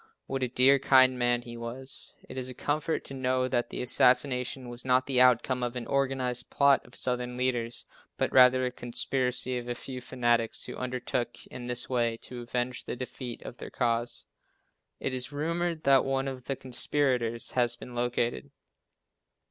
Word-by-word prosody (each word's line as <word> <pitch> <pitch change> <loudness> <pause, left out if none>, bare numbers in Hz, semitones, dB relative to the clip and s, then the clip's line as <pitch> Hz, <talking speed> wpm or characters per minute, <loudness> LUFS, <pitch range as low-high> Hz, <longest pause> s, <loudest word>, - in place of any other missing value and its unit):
What 135 0 -3
a 130 - +1
dear, 130 +3 +5
kind 130 -1 +5
man 120 0 +2
he 120 0 -8
was. 125 +4 -5
It - - -9
is 130 -1 -3
a 130 - -8
comfort 155 +5 -1
to - - -6
know 130 -1 0
that 120 -2 0
the - - -4
assassination 125 0 +2
was 120 0 -6
not 130 0 +3
the 130 -2 +2
outcome 125 0 +4
of 120 0 -2
an 125 -2 -4
organized 130 -2 -1
plot 140 -1 +4
of 120 - -14
Southern 125 -1 -1
leaders, 120 -2 -1 0.3
but - - 0
rather 130 0 +6
a 125 - -1
conspiracy 125 +1 0
of 120 - -9
a 120 - -2
few 125 +1 -7
fanatics, 120 -2 0
who - - -7
undertook 125 -1 -3
in 125 -1 -7
this 125 0 -1
way 120 -3 0
to 125 -1 -6
avenge 125 +1 -3
the - - -4
defeat 125 -1 -6
of 120 - -9
their - - -8
cause. 120 -1 -1 0.7
It 135 - -2
is 125 +1 -2
rumored 165 +2 -2
that 135 -1 +5
one 135 0 -1
of 130 -2 -6
the 135 - -2
conspirators 125 -2 0
has 120 -1 +2
been 125 +1 -10
located. 120 +2 -1
125 Hz, 180 wpm, -29 LUFS, 120-130 Hz, 0.7 s, rather